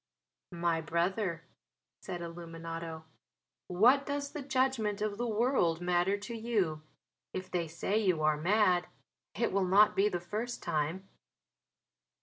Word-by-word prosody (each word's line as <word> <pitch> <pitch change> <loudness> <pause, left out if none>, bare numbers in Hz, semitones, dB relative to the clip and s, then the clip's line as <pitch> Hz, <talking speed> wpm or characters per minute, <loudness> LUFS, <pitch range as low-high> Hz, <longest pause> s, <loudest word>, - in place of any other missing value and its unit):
"My 170 -1 +1
brother," 170 +2 -1 0.6
said 175 -2 -5
Illuminate, 165 -1 -7 0.6
"what 240 +10 +5
does 285 0 -3
the 300 - -5
judgment 260 -6 0
of 210 0 -2
the 240 - 0
world 215 -7 +2
matter 180 +2 +1
to 205 +3 -7
you? 210 -9 0 0.5
If 185 0 -5
they 175 -2 -1
say 190 +6 -1
you 180 -7 +1
are 155 0 +4
mad 180 +2 +2 0.5
it 235 - 0
will 190 -1 +1
not 205 +3 +5
be 200 +2 +3
the 180 -3 -2
first 215 +8 -4
time!" 160 +6 -2
185 Hz, 130 wpm, -32 LUFS, 170-220 Hz, 0.6 s, what